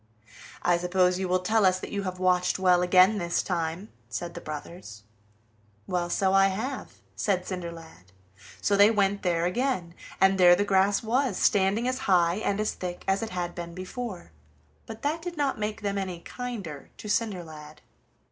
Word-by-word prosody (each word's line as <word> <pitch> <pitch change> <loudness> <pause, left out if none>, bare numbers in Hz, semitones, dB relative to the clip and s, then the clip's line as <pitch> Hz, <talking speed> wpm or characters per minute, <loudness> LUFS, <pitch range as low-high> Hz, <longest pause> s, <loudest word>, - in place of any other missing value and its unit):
"I 175 -1 +3
suppose 180 +1 +2
you 190 - -1
will 180 0 +1
tell 220 +3 +2
us 185 -1 +3
that - - -8
you 200 - -2
have 185 -2 -4
watched 180 -1 +2
well 180 -1 +4
again 185 +3 +5
this 170 -1 0
time," 170 +3 -3 0.2
said 175 -1 -5
the - - -8
brothers. 150 - -8 0.8
"Well, 175 +3 -2
so 190 +1 +1
I 195 0 +6
have," 225 +8 -4 0.2
said 185 -4 0
Cinderlad. 165 - -8 0.5
So 205 - +2
they 205 +1 +7
went 200 -2 +1
there 170 -2 +1
again, 180 -3 -1 0.3
and 190 0 +4
there 175 -1 +8
the 205 - 0
grass 195 +1 +2
was, 240 -1 0
standing 200 +4 +2
as 255 0 -1
high 175 -1 +4
and 205 -2 -1
as 215 - 0
thick 180 -1 -6
as 195 0 +1
it 225 - -3
had 175 -2 -3
been 170 -1 -7
before, 185 - -6 0.6
but 225 0 -9
that 310 +3 -1
did 345 -1 -6
not 280 -5 0
make 210 +1 -3
them 200 -1 -1
any 185 -3 -5
kinder 205 - -7
to - - -9
Cinderlad. 160 -9 -3
185 Hz, 175 wpm, -27 LUFS, 175-210 Hz, 0.8 s, there